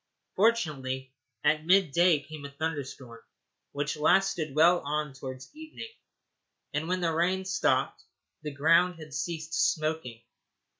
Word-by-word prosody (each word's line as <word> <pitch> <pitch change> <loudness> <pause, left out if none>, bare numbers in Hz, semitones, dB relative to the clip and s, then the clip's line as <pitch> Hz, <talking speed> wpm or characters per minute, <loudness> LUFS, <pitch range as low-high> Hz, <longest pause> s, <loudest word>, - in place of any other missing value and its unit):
Fortunately, 140 - 0 0.3
at 155 +1 +2
mid 185 -4 +4
day 170 -1 +4
came 155 0 -10
a 140 - -6
thunderstorm 140 -5 -5 0.5
which 145 +1 -2
lasted 155 -2 +2
well 170 +3 +5
on 150 0 -3
towards 130 -1 -8
evening, 315 +8 -9 0.8
and 150 +2 -2
when 185 +1 -1
the 165 -2 +1
rain 185 +3 +1
stopped 190 0 0 0.4
the 150 - -4
ground 165 +5 +3
had 155 -3 -11
ceased 160 +2 -4
smoking. 155 -10 -1
155 Hz, 130 wpm, -28 LUFS, 140-175 Hz, 0.8 s, well